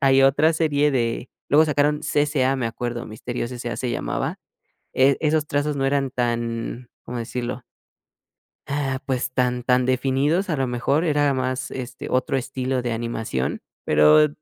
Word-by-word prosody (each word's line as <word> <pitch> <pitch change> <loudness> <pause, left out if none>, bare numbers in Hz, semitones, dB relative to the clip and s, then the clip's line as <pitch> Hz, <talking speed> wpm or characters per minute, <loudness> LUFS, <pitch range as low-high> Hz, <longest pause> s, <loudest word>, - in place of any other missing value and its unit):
hay 135 -1 +5
otra 145 +4 +4
serie 150 -2 +2
de 120 -1 -1 0.2
luego 150 +3 +6
sacaron 150 0 +2
CCA 145 -3 +1
me 120 -3 -1
acuerdo, 120 +1 -4
Misterios 120 +2 -5
SA 120 -1 -4
se 125 - -2
llamaba, - - -2 0.6
eh, 135 +1 +4
esos 155 -1 +1
trazos 145 +1 -1
no 135 - 0
eran 135 -1 +1
tan, 120 0 -2 0.2
cómo 120 0 -5
decirlo 120 +1 -4 1.1
ah, 135 -2 -1
pues, 130 -1 -1
tan 125 -1 0
tan 125 0 +3
definidos, 135 +8 +1
a 155 - +1
lo 135 - +1
mejor 130 +6 0
era 145 -2 +2
más, 130 0 -2
este, 130 -1 -6
otro 130 +1 +1
estilo 130 0 -2
de 120 -1 -2
animación, 115 - -3 0.2
pero, 75 - +6
130 Hz, 155 wpm, -23 LUFS, 120-145 Hz, 1.1 s, luego